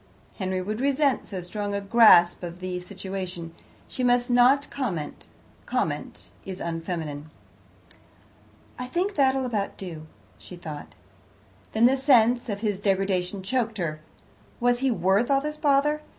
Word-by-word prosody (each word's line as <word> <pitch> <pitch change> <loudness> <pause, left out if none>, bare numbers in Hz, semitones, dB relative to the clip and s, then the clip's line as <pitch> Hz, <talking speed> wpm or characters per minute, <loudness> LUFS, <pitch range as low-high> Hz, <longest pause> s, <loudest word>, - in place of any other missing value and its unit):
"Henry 185 -1 -2
would 215 +4 -4
resent 280 -1 +1
so 190 - -5
strong 205 +3 -4
a - - 0
grasp 200 -4 +6
of 175 0 -7
the 185 -1 -4
situation. 185 -3 -6 0.3
She 255 - -4
must 245 0 +2
not 255 +4 +5
comment; 185 - -4 0.4
comment - - -2 0.2
is 190 -1 -7
unfeminine. 165 -3 -4 1.5
"I 250 - -4
think 360 +9 -1
that'll 265 -3 +2
about 215 -5 -2
do," 165 -5 -8 0.3
she 180 - -10
thought. 155 -4 -9 0.8
Then 220 +2 +4
the 265 +2 +4
sense 245 -3 +4
of 205 -1 -3
his 205 -4 -1
degradation 195 -1 0
choked 225 +1 -1
her. 155 -4 -3 0.6
Was 245 0 +2
he 270 +1 +1
worth 205 +1 +2
all 275 -1 +4
this 300 +2 -4
bother? 295 +1 +2
205 Hz, 140 wpm, -25 LUFS, 180-250 Hz, 1.5 s, grasp